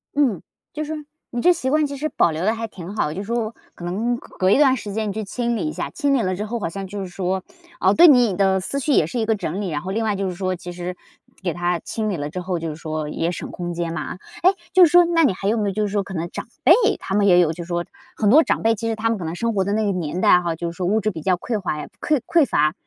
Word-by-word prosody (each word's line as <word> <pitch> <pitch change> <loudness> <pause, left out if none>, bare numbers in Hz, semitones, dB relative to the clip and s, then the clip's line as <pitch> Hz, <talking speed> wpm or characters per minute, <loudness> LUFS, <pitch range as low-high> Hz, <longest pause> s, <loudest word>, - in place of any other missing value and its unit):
嗯， 260 - +2 0.3
就 305 - -3
是 305 0 -5 0.2
你 240 - -3
这 360 - +6
习 260 -6 -2
惯 305 +2 +3
其 280 -1 -5
实 305 +3 -2
保 170 - +2
留 160 +3 -3
得 220 +2 +2
还 225 0 -4
挺 190 -1 -9
好， 150 -8 0
就 195 +5 -5
说 230 +1 -2 0.2
可 - - -11
能 225 +7 -1
隔 - - -16
隔 185 +1 +3
一 - - +5
段 275 -3 +5
时 210 -3 -6
间 215 -1 -1
去 220 +1 -3
清 235 +3 -2
理 310 - -2
一 - - -2
下， - - -4
清 285 -3 0
理 265 - +3
了 185 -3 -1
之 205 +3 -4
后 235 +2 -3
好 175 - -2
像 195 +2 -6
就 200 +1 -6
是 190 - -4
说， 185 +1 -2 0.4
哦， - - +4
对 345 +2 +8
你 245 - +5
的 190 0 +2
思 275 +9 -1
绪 280 +1 +1
也 160 - +4
是 235 +10 -4
一 225 - 0
个 220 0 +2
整 195 -1 -3
理， 195 - -2
然 150 -2 -2
后 185 - -5
另 225 +3 -1
外 215 -2 0
就 195 0 -2
是 - - -4
说 185 0 -2
其 175 0 -8
实 175 +1 -5 0.5
给 175 - -1
它 175 0 -1
清 215 +6 -3
理 200 - -1
了 145 -2 -4
之 180 - -5
后， 180 0 -2
就 165 0 -4
是 150 - -5
说 155 -1 -4
也 165 +3 -1
省 - - -6
空 175 -1 -5
间 170 -1 -3
嘛。 155 -2 -4 0.3
诶， 370 - +7 0.2
就 370 -1 +8
是 310 - +1
说 350 0 +8
那 335 -1 +3
你 250 - +4
还 195 +1 -4
有 225 - +1
没 210 -2 0
有 - - -3
就 215 +1 0
是 205 - -4
说 205 0 +1
可 195 - -9
能 170 -1 -3
长 - - -6 0.2
辈， - - +6 0.3
他 190 - -5
们 200 0 +3
也 180 -2 +6
有 170 -3 +3
就 170 +2 -6
是 - - -13
说 175 0 -2 0.3
很 210 - +2
多 305 +8 +7
长 - - 0
辈， 225 0 +4
其 230 +1 -4
实 225 - 0
他 225 +1 0
们 225 - 0
可 175 - -5
能 160 +2 -4
生 230 +5 -1
活 195 -2 +1
的 200 +2 -1
那 220 +1 +1
个 200 - +1
年 180 -1 -3
代， 180 - +6
哈， 170 -2 -2
就 170 +1 -4
是 - - -13
说 180 -2 -1
物 215 +3 +2
质 215 +1 0
比 165 -4 -7
较 185 +3 +2
匮 215 +5 -3
乏 165 -5 -2
呀， 150 - -6
匮 300 -2 +2
匮 330 -4 +4
乏， 155 - +2
200 Hz, 345 characters per minute, -22 LUFS, 175-230 Hz, 0.5 s, 对